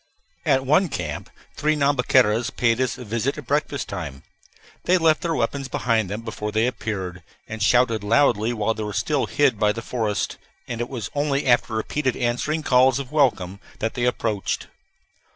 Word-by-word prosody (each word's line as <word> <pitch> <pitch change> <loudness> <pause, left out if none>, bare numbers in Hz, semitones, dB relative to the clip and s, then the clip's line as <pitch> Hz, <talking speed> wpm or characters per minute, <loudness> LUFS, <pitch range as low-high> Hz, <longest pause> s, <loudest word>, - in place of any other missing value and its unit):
At 135 0 +3
one 160 +7 +3
camp - - -4 0.3
three 155 +1 +1
Nhambiquaras 125 -5 +3
paid 120 0 +1
us 130 - -1
a 125 - -8
visit 115 +6 -1
at 150 - -8
breakfast 145 +1 -1
time. 75 -8 -6 0.6
They 185 - +4
left 160 -2 +3
their 165 -2 -1
weapons 135 +4 -1
behind 115 -6 0
them 105 +3 -4
before 110 -2 -5
they 110 +2 +2
appeared, 95 -7 -4 0.3
and 110 0 -6
shouted 115 -1 +3
loudly 115 -1 +3
while 110 -1 0
they 110 - -6
were 105 -1 -4
still 135 +7 0
hid 135 -7 +2
by 105 0 +3
the 115 - -6
forest, 110 -5 -2 0.3
and 120 -1 -4
it 120 - -3
was 120 -6 -5
only 145 -1 0
after 120 -2 +2
repeated 130 +4 -1
answering 130 +6 -1
calls 130 0 +4
of 135 -2 -6
welcome 105 -11 +1 0.2
that 110 - -2
they 120 - -1
approached. 110 -5 -1
120 Hz, 175 wpm, -23 LUFS, 110-140 Hz, 0.6 s, They